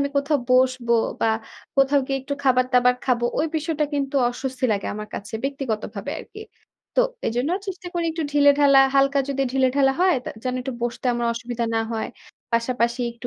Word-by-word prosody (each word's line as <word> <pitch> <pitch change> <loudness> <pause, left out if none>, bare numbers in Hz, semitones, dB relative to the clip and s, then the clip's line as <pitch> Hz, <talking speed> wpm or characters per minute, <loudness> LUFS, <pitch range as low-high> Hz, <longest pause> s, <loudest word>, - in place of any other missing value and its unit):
আমি 280 - +1
কোথাও 285 +1 +2
বসব 255 -1 +2 0.3
বা - - +2 0.5
কোথাও 275 +1 +4
গিয়ে 270 0 -1
একটু 280 +1 -3
খাবার 255 -2 +4
দাবার 250 0 +4
খাবো, 240 -2 +1
ওই 315 - +2
বিষয়টা 310 -1 -1
কিন্তু 280 -1 -2
অস্বস্তি 260 +1 -4
লাগে 200 - -2
আমার 210 0 -6
কাছে 205 +2 -7
ব্যক্তিগতভাবে 230 -7 -3
আরকি। 425 - -11 0.5
তো - - +4 0.3
এজন্য 245 +7 0 0.2
চেষ্টা 370 -2 -6
করি 345 -1 0
একটু 325 0 -3
ঢিলেঢালা, 285 -1 +5 0.2
হালকা 275 +1 +4
যদি 275 -1 0
ঢিলেঢালা 270 +1 +3
হয়, 370 -1 +4 0.3
যেন 255 -1 -2
একটু 260 +1 -4
বসতে 240 +2 -3
আমার 240 0 -1
অসুবিধা 240 0 -3
না 225 - +2
হয়। 220 -1 -2 0.4
পাশাপাশি 235 +1 0
একটু 235 +1 -9
265 Hz, 170 wpm, -23 LUFS, 240-280 Hz, 0.5 s, ঢিলেঢালা